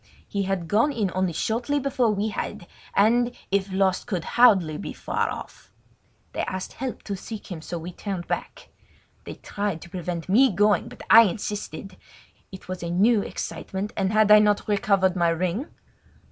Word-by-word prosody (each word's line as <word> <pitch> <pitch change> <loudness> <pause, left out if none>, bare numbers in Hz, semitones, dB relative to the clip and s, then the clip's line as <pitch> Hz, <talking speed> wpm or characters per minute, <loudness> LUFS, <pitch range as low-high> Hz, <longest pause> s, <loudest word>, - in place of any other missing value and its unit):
He 200 - -2
had 185 -4 -2
gone 225 - +3
in 210 -8 -1
only 185 -1 0
shortly 240 - -1
before 260 -4 +1
we 210 +1 0
had, 195 - -5 0.3
and, 240 +4 +3 0.2
if 195 0 0
lost, 190 -1 +1
could 185 -8 -2
hardly 190 -10 +5
be 175 - -6
far - - -2
off. - - -9 0.6
They - - -2
asked 185 0 -5
help 260 -1 -5
to 200 - -4
seek 205 +2 -8
him, 165 -3 -5
so 170 - -5
we 170 +2 -7
turned 185 -1 -5
back. - - -5 0.6
They - - -7
tried 200 -5 -3
to 175 - -14
prevent 175 -2 -4
me 250 +8 +5
going, 205 +2 +2
but 245 - -11
I 225 +1 +10
insisted. 200 -2 -5 0.5
It 190 - -11
was 185 0 -5
a 170 - -4
new 205 +5 +3
excitement, 195 +1 -5
and 190 -1 0
had 215 -1 +4
I 210 - +10
not 210 -1 +2
recovered 195 -2 +2
my 170 -2 +2
ring? 185 - -1
200 Hz, 175 wpm, -25 LUFS, 180-215 Hz, 0.6 s, I